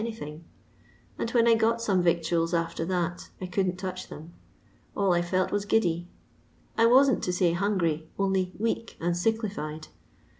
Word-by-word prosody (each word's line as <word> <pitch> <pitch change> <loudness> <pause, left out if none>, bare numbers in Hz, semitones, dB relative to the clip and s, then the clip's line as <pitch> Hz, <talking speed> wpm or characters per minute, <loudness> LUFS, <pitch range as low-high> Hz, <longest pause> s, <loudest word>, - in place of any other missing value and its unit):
anything; 165 -9 -6 0.8
and - - -1
when 235 -1 +3
I 230 - +7
got 225 +1 +2
some 200 -5 +1
yictnals 170 0 +1
after 165 0 -2
that, 175 -1 -2
I 185 - -4
couldn't 180 0 -1
touch 185 -1 -5
them. 160 +3 -10 0.6
All 195 -3 +3
I 175 - +2
felt 185 +2 0
was 205 0 0
giddy; 175 -5 +1 0.7
I 230 0 +5
wam't 265 +2 +5
to - - -1
laj 180 -1 +2
hungry, 170 -5 0
only 190 -2 +1
weak 230 +1 -2
and 175 +1 0
tieklified. 175 -6 -2
185 Hz, 155 wpm, -27 LUFS, 170-220 Hz, 0.8 s, I